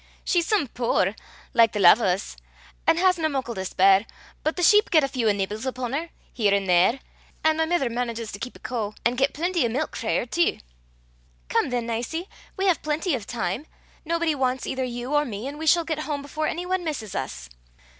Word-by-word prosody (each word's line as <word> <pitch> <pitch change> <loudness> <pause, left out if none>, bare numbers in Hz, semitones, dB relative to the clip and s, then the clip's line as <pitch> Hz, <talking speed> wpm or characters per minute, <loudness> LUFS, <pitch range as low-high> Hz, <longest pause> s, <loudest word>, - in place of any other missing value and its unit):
"She's 350 -2 +1
some 415 -10 +2
puir, 225 -5 0 0.4
like 230 -1 +5
the 210 - -2
lave 195 +5 +7
o' - - +1
's, 185 +2 -1 0.5
an' 325 - +5
hasna 355 -3 +3
muckle 265 -4 -3
to 190 - -4
spare, 195 +3 +4 0.4
but 310 - 0
the 355 - -2
sheep 420 +4 +6
get 315 -3 +5
a - - +2
feow 245 -5 +1
nibbles 205 +2 -3
upon 255 -1 -3
her, 325 +4 -2 0.2
here 205 -4 +2
an' 200 -1 0
there; 185 +8 +3 0.4
an' 315 0 +3
my 320 - +2
mither 325 -5 +1
manages 235 -2 -3
to 200 - -8
keep 250 - -6
a - - -13
coo, 215 -4 -4
an' 240 - +3
get 270 +2 +1
plenty 345 +1 0
o' 235 - +1
milk 245 +4 -2
frae 225 - 0
her - - -1
tee." 340 +8 0 0.9
"Come, - - +1
then, 245 -2 -1
Nicie. 240 +10 -3 0.3
We 385 - 0
have 365 -5 +3
plenty 310 +3 -1
of 230 -6 -3
time. 245 +5 -3 0.4
Nobody 335 0 0
wants 260 -2 -1
either 260 0 -2
you 245 +2 -4
or 295 0 +4
me, 225 -2 -5
and 290 +2 -7
we 320 - -4
shall 340 +2 +5
get 315 -2 -3
home 295 -2 -3
before 310 +2 -3
any 350 +2 -3
one 370 0 -1
misses 250 - -4
us." 130 - -5
260 Hz, 215 wpm, -25 LUFS, 225-320 Hz, 0.9 s, lave